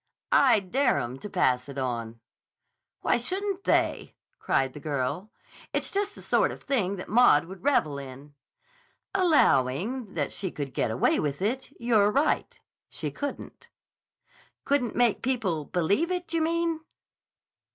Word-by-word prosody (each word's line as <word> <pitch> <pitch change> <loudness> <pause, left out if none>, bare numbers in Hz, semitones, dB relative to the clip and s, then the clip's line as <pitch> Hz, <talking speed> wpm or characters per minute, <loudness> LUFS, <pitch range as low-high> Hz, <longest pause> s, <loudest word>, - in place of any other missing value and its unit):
I 245 -7 +5
dare 250 +8 +1
'em 120 +2 -4
to 210 - -7
pass 130 -9 +1
it 140 - -8
on!" 115 -3 -3 0.8
"Why - - +2
shouldn't 390 - -3
they?" - - +1 0.2
cried 135 -1 0
the - - -9
girl. 145 +6 -3 0.4
"It's - - -1
just 405 0 -1
the - - -12
sort - - +2
of - - -10
thing 200 -8 0
that 185 - -7
Maud 215 -10 +5
would 190 +2 -11
revel 155 - +1
in." 140 +2 -10 0.8
"Allowing 240 - +2
that - - -1
she 190 - -3
could 140 -5 -6
get - - 0
away 110 +3 +2
with 145 -2 -2
it, 240 +8 -2
you're 220 -4 +3
right. 280 +8 0 0.3
She - - -4
couldn't." 285 0 -7 1.0
"Couldn't 265 -5 0
make 240 -3 +2
people 195 - -1
believe 195 - +1
it, 360 -2 -3
you 330 - +1
mean?" 335 0 0
200 Hz, 145 wpm, -27 LUFS, -, 1.0 s, I